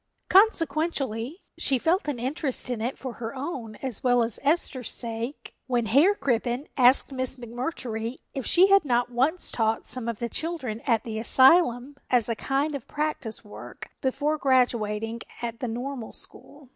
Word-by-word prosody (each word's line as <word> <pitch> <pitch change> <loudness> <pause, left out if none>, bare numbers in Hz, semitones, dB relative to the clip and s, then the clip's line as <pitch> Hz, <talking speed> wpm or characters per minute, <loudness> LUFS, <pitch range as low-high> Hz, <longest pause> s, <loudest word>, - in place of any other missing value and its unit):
Consequently, 315 - +2 0.2
she 270 - +4
felt 330 - +1
an 290 -4 -2
interest 260 +1 -1
in 235 -3 -3
it 245 +4 -2
for 255 -2 -6
her 225 +3 -4
own 260 -6 -5
as 255 -6 -3
well 245 -2 +4
as 230 -2 -1
Esther's 280 -4 +1
sake 235 +3 -4
when 240 -3 0
Herr 290 - +4
Crippen 245 - -1
asked 255 +1 +4
Miss 260 -1 0
McMurtry 240 -1 -4 0.2
if 270 - -4
she 370 +8 +5
had 395 -2 +6
not 245 -3 0
once 275 +9 +1
taught 225 -1 0
some 250 -2 -2
of 230 -2 -2
the 235 - -3
children 265 -7 -4
at 230 -3 +2
the 220 -2 -4
asylum 260 +1 +4
as 245 -3 +3
a 230 - 0
kind 280 +6 -1
of 275 -4 -6
practice 295 -8 -3
work 210 - -10
before 295 +3 0
graduating 230 -4 +1 0.2
at 230 -1 -4
the 250 - -3
Normal 245 +1 -5
School. 285 -3 -9
255 Hz, 165 wpm, -26 LUFS, 230-285 Hz, 0.2 s, had